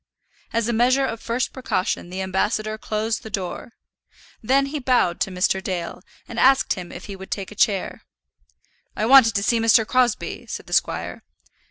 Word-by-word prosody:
As 230 -1 0
a 240 - 0
measure 255 +4 +3
of 230 -3 -4
first 235 +2 -2
precaution 190 -8 -2
the 190 +1 -4
ambassador 210 +3 -1
closed 220 +1 -2
the 220 - -9
door; 195 +3 -5 0.7
then 270 +5 +2
he 290 +2 -4
bowed 245 -10 +1
to - - 0
Mr. 185 +1 0
Dale, 175 -3 -4 0.3
and 235 - -5
asked 270 +1 +4
him 180 -3 -8
if - - -9
he 200 - -7
would 190 0 -11
take 195 -1 -4
a - - -7
chair. 205 -3 0 0.9
"I 215 - -1
wanted 250 -2 +7
to 200 - +1
see 230 +2 +2
Mr. 225 0 +4
Crosbie," 245 -1 0
said - - -6
the - - -9
squire. - - -1
220 Hz, 180 wpm, -22 LUFS, 190-245 Hz, 0.9 s, wanted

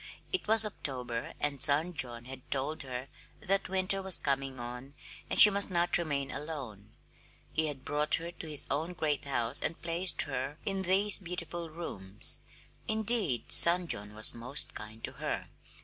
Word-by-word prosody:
It 375 - -3
was 220 0 +6
October, 125 - -6
and 145 -2 -4
son 155 +4 +3
John 120 -5 0
had 130 0 -12
told 140 +3 -3
her 130 -1 -8 0.3
that 195 -1 -1
winter 190 +1 0
was 190 -1 +5
coming 135 -2 -4
on 125 +3 -10 0.3
and - - -2
she 210 - +12
must 200 +1 +2
not 175 -1 0
remain 140 -5 -4
alone. 130 -9 -8 0.6
He 160 0 -1
had 140 -3 -7
brought 150 +1 -1
her 170 +1 -7
to 165 -2 -11
his 150 -2 +3
own 160 +5 -4
great 155 -5 -3
house 130 -1 -3
and 165 - -5
placed 170 +2 +2
her 135 +1 -6
in 195 -1 -3
these 195 +3 +3
beautiful 170 -2 -8
rooms 105 - 0 0.5
indeed, 220 - 0
son 175 +1 +8
John 105 -8 -6
was 110 0 +5
most 125 +5 -3
kind 110 +1 -11
to - - -2
her! - - -7
150 Hz, 165 wpm, -29 LUFS, 130-180 Hz, 0.6 s, she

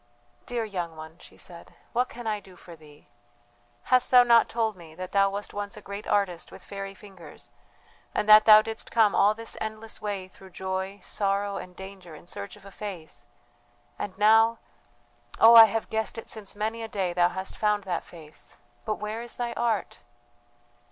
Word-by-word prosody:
"Dear 240 -2 -2
young 175 -6 -5
one," 160 +2 -11
she - - -16
said, 170 -2 -13 0.2
"what 250 +1 +1
can 240 0 -9
I 215 -1 -1
do 190 -2 -17
for 175 -1 -13
thee? 150 -2 -18 0.8
Hast 255 -1 +2
thou 250 -1 +8
not 235 -1 +5
told 225 -2 -1
me 165 -3 -14
that 185 +1 -7
thou 195 0 +3
wast 200 +1 -6
once 205 0 -5
a - - -7
great 200 +1 -8
artist 185 -4 0
with - - -13
fairy 195 -1 -7
fingers, 190 -4 -14 0.6
and 210 - 0
that 215 0 +9
thou 215 -1 +9
didst 225 0 -6
come 220 -3 +3
all 210 +2 +4
this 230 +1 -4
endless 220 0 -5
way 200 -3 -4
through 190 +1 -16
joy, 190 +2 -4
sorrow, 200 0 -1
and 180 0 -9
danger, 190 -3 -10
in 150 - -14
search 100 - -8
of 205 -1 -18
a 195 - -11
face... 190 -5 -8 0.7
and 195 -2 -5
now.... 225 +2 +5 0.8
Oh, 225 +1 +8
I 225 -1 +12
have 220 +1 -2
guessed 220 0 -2
it 225 - -7
since 210 -3 -8
many 220 +2 -3
a 225 - -4
day 190 -5 -2
thou 175 0 +3
hast 190 +1 -6
found 210 -1 +1
that 180 -3 -3
face 160 -3 -10 0.3
but 215 - -1
where 215 +2 -5
is 240 0 -9
thy 240 -1 -3
art? 230 -3 -1
205 Hz, 190 wpm, -27 LUFS, 185-220 Hz, 0.8 s, I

